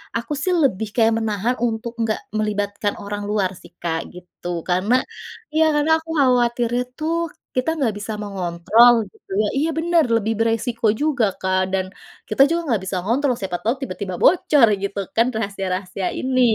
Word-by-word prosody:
aku 235 +5 -3
sih 365 -1 +1
lebih 220 -5 +1
kayak 225 -1 +4
menahan 220 +2 -1
untuk 230 +1 -4
enggak 220 -1 0
melibatkan 205 -1 -1
orang 205 0 -4
luar 200 -3 +1
sih - - -15
Kak, 165 -1 -1 0.2
gitu. 180 0 -11 0.2
Karena 185 +7 +1 0.6
iya 315 +1 +4
karena 295 +2 +2
aku 325 0 -16
khawatirnya 245 -2 +2 0.2
tuh 320 +2 0 0.4
kita 255 +5 +1
nggak 245 -8 +1
bisa 210 +2 -5
mengontrol 195 +5 +4 0.2
gitu - - -27
ya. 210 - +1
Iya 310 +4 +1
bener, 335 0 +3
lebih 225 0 +1
beresiko 230 0 0
juga, 290 -6 +2
Kak. 185 0 +1
Dan 190 -1 +1 0.4
kita 215 +5 +2
juga 340 +1 0
enggak 230 -9 0
bisa 185 -1 -2
ngontrol. 255 +3 +1
Siapa 185 -3 -3
tahu 230 +4 +1
tiba-tiba 185 -4 -5
bocor 295 -7 +5 0.2
gitu 200 0 -3 0.2
kan 230 +2 +4
rahasia-rahasia 195 -3 -3
ini, 255 -1 +1
225 Hz, 165 wpm, -21 LUFS, 200-255 Hz, 0.6 s, bocor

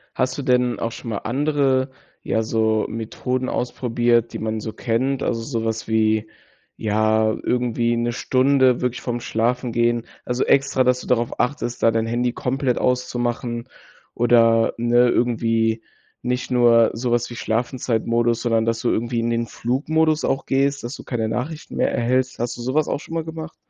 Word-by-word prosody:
Hast 130 0 0
du - - -2
denn 125 -3 +1
auch 115 - -2
schon 115 - -8
mal 105 - -2
andere, 135 +1 +1 0.3
ja, 110 - 0
so 110 -1 +1
Methoden 125 +3 -3
ausprobiert, 120 -1 0
die - - -4
man 110 0 -2
so 110 0 -6
kennt? 130 +4 -1
Also, 115 -1 -1
sowas 115 -2 -3
wie, 110 -1 +1 0.5
ja, 110 0 +1
irgendwie 120 -1 0
'ne 120 0 0
Stunde 130 0 +3
wirklich 125 0 -2
vorm 120 -1 -3
Schlafengehen 120 0 0 0.2
also, 125 +1 0
extra, 140 -1 +3
dass 125 0 +2
du - - -10
darauf 120 -1 0
achtest, 125 -2 -2
da 115 - +5
dein 115 0 0
Handy 120 +1 0
komplett 130 0 -1
auszumachen 120 -1 -1 0.5
oder, 115 -1 +4
ne, 120 +1 +3
irgendwie 115 -2 +1 0.4
nicht 125 +1 -2
nur 120 -2 +5
sowas 120 0 -1
wie 120 - -8
Schlafenszeitmodus, 120 0 0
sondern 115 -2 +1
dass 115 0 -1
du 120 - +1
irgendwie 120 +1 -1
in 115 - -1
den 115 0 -1
Flugmodus 155 +7 0
auch 135 - -1
gehst, 140 +1 +1
dass 120 +4 -5
du - - -10
keine 115 -3 -2
Nachrichten 135 +8 -4
mehr - - +2
erhältst. 125 +2 0
Hast 120 +1 -2
du - - -7
sowas 135 +5 0
auch - - -1
schon 160 - -10
mal 165 -1 -1
gemacht? 160 0 -7
120 Hz, 165 wpm, -22 LUFS, 115-130 Hz, 0.5 s, da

